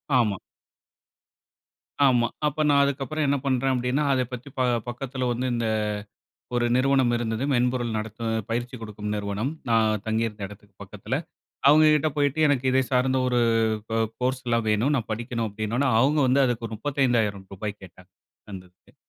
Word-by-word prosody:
ஆமா. 105 -6 +2 1.7
ஆமா, 120 -3 +4 0.2
அப்ப 155 +1 -1
நான் 140 -1 +5
அதுக்கப்புறம் 140 +2 -1
என்ன 140 0 +2
பண்றேன் 135 0 +1
அப்டின்னா, 125 +4 0
அதை 130 -1 +1
பத்தி 125 +3 -7
ப 130 - +2 0.3
பக்கத்துல 130 +1 -4
வந்து 125 +2 -2
இந்த, 115 -1 -1 0.9
ஒரு 120 0 +2
நிறுவனம் 130 -2 +3
இருந்தது, 115 +2 -2
மென்பொருள் 120 -2 0
நடத்துற 110 +1 -5 0.2
பயிற்சி 120 +2 -2
கொடுக்கும் 105 -1 -5
நிறுவனம், 105 +7 -2 0.2
நான் 110 -2 +2
தங்கி 110 +1 +1
இருந்த 105 -2 -7
எடத்துக்கு 105 -1 -16
பக்கத்துல. - - -4 0.5
அவங்க 155 +1 +6
கிட்ட 155 +1 +1
போயிட்டு 145 +1 +1
எனக்கு 135 -2 +1
இத 130 0 +3
சார்ந்த 130 +1 +2
ஒரு 125 -1 +2 0.5
கோ 115 - +1 0.2
கோர்ஸ்லாம் 125 -3 0
வேணும், 115 +8 +2
நான் 115 - -4
படிக்கணும் 115 0 -3
அப்டின்னோடனே 110 +6 -1
அவங்க 145 +3 +3
வந்து 135 +2 +4
அதுக்கு 115 -2 -2
ரூ.35,000 105 -6 -1
கேட்டாங்க, 90 0 -15 0.4
அந்த 95 -1 -7
இதுக்கு. 90 - -28
120 Hz, 150 wpm, -25 LUFS, 110-135 Hz, 1.7 s, அவங்க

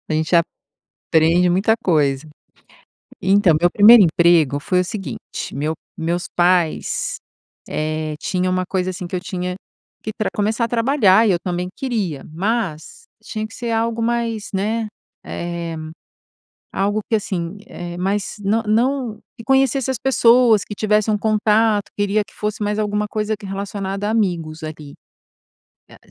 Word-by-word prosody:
a - - 0
gente 160 +2 0 0.6
aprende 165 +3 +2
muita 195 +5 +3
coisa. 145 -4 +1 0.9
Então, 195 -2 +4
meu 175 +1 +4
1º 215 +2 +8
emprego 165 -4 +3
foi 180 +5 0
o - - -2
seguinte. 195 0 -6
Meu 150 +4 -1 0.2
meus 170 +2 -2
pais, 175 -2 +1 0.5
eh, 155 0 -2
tinha 185 -1 -1
uma 185 0 0
coisa 185 0 -1
assim, 180 0 -6
que - - -18
eu - - -1
tinha 180 -1 -4 0.5
que 215 - -3
pra 215 - 0
começar 215 +3 0
a - - -3
trabalhar 230 -3 +4
e - - +4
eu 175 - +1
também 180 0 -2
queria. 210 - -3
Mas, 195 - -3 0.2
tinha 215 -1 -4
que 215 - -16
ser 240 -2 -4
algo 230 0 0
mais 230 -2 -1
né, 215 +3 -1 0.4
eh, 170 -1 -4 1.0
algo 205 +2 0
que 225 - +3
assim, 185 -4 -3
eh, 175 0 -7
mais 195 +2 -2
não 220 +3 +1
não 240 +2 0 0.2
que 230 - -10
conhecesse 270 -1 +2
as 260 - -2
pessoas, 240 -4 +4
que 205 - -6
tivesse 215 +1 +1
um 210 - +2
contato 215 0 +2
queria 205 +1 +1
que - - -21
fosse 210 +1 -3
mais 210 +1 -1
alguma 210 0 -1
coisa 215 +1 -2
que 200 - -11
relacionada 195 0 -4
a - - 0
amigos, 170 -8 -1
ali. 155 -2 -8 1.0
Eh, - - -15
200 Hz, 155 wpm, -20 LUFS, 175-220 Hz, 1.0 s, 1º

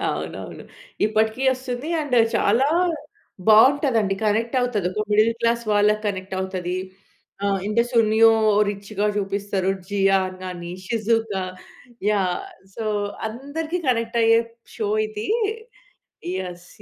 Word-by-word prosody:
అవునవును. - - -5 0.4
ఇప్పటికి 220 +3 0
వస్తుంది. 255 +2 -5
అండ్ 285 -5 -1 0.2
చాలా 245 +7 +3 0.8
బాగుంటది 260 +3 +6
అండి. 195 -2 0
కనెక్ట్ 225 +4 +1
అవుతది. 225 -7 0
ఒక 215 - -1
మిడిల్ 215 +2 +4
క్లాస్ 235 0 +1
వాళ్ళకి 210 +1 +3
కనెక్ట్ 190 -1 -3
అవుతది. 185 -1 -3 0.7
ఆ! - - +2 0.2
ఇంటి 215 +3 +2
సునియో 225 -1 +5 0.4
రిచ్‌గా 205 +1 -3
చూపిస్తారు. 200 -1 -1 0.2
జియాన్ 195 -2 +1
గాని, 175 -2 -6 0.2
షిజుకా, 225 -3 0 0.7
యాహ్! 190 -4 0 0.3
సో, 225 - -5 0.4
అందరికి 290 +9 -4
కనెక్ట్ 230 -1 0
అయ్యే 225 0 +5 0.4
షో 215 - -2 0.2
ఇది. 215 0 -6 1.2
ఎస్. 175 0 -13
215 Hz, 110 wpm, -23 LUFS, 195-235 Hz, 1.2 s, బాగుంటది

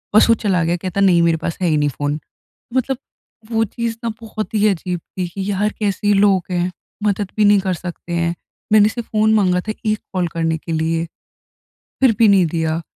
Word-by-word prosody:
बस 215 - +6
वो 230 - +6
चला 185 -4 +2
गया, 170 +1 +1
कहता, 185 +2 -4
"नहीं, 180 -3 +5
मेरे 165 -1 +3
पास 165 0 -4
है 180 - +2
ही 155 -2 +2
नहीं 145 0 +2
फ़ोन।" 145 +3 -3 0.6
मतलब 260 0 0 0.5
वो 225 0 +2
चीज़ 230 +2 -3
ना 230 - 0
बहुत 215 -1 -6
ही 210 0 +4
अजीब 180 -2 -2
थी 180 +1 -5
कि, 195 +3 -4
"यार, 205 +2 +1
कैसे 205 0 +1
लोग 195 -2 +4
हैं? 180 0 0 0.3
मदद 205 -1 0
भी 210 - +4
नहीं 205 -1 +6
कर 190 -1 -1
सकते 175 0 -7
हैं। 170 0 0 0.4
मैंने 210 0 +6
सिर्फ़ 235 0 -6
फ़ोन 215 0 +3
माँगा 180 -4 +2
था, 215 +2 -4
1 215 -1 +1
कॉल 180 -2 0
करने 165 -1 0
के 165 - -8
लिए। 165 +1 0 1.0
फिर 255 -5 +5
भी 225 - +6
नहीं 195 -4 +5
दिया।" 160 0 -1
190 Hz, 210 wpm, -19 LUFS, 170-215 Hz, 1.0 s, बस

